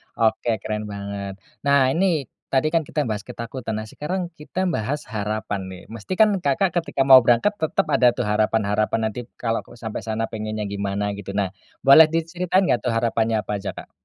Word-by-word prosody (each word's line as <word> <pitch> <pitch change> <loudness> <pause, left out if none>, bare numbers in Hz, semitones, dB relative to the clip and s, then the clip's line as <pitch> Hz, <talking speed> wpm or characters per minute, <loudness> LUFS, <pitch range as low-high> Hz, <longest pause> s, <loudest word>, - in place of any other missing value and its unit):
Oke, 115 0 +1
keren 105 0 -3
banget. 100 -1 -5 0.2
Nah, 140 -2 +3
ini 170 -3 +1 0.2
tadi 135 +3 +1
kan 165 -3 +1
kita 150 - -1
bahas 105 -2 -3
ketakutan, 115 -1 -5
nah 110 - -6
sekarang 180 - -3
kita 175 +5 -3
bahas 130 +7 -2
harapan 105 -1 -3
nih. 90 -1 -10
Mesti 115 - -5
kan 210 -3 +5
Kakak 160 +7 +2
ketika 155 -5 -1
mau 135 -1 +9
berangkat 120 - +3
tetep 160 - +1
ada 125 - +5
tuh 125 - -1
harapan-harapan, 105 0 +1
nanti 120 +2 -7
kalo 115 -1 0
aku - - -16
sampe 110 -2 -5
sana 110 0 -2
pinginnya 110 -1 -4
gimana 100 0 -2
gitu. 100 -1 -7
Nah, 100 -2 0 0.3
boleh 140 +4 +9
diceritain 175 +3 +1
gak 120 - +2
tuh - - +2
harapannya 115 -1 +1
apa 105 - -3
aja, 95 -1 -4
Kak? - - -10
115 Hz, 185 wpm, -23 LUFS, 105-145 Hz, 0.3 s, mau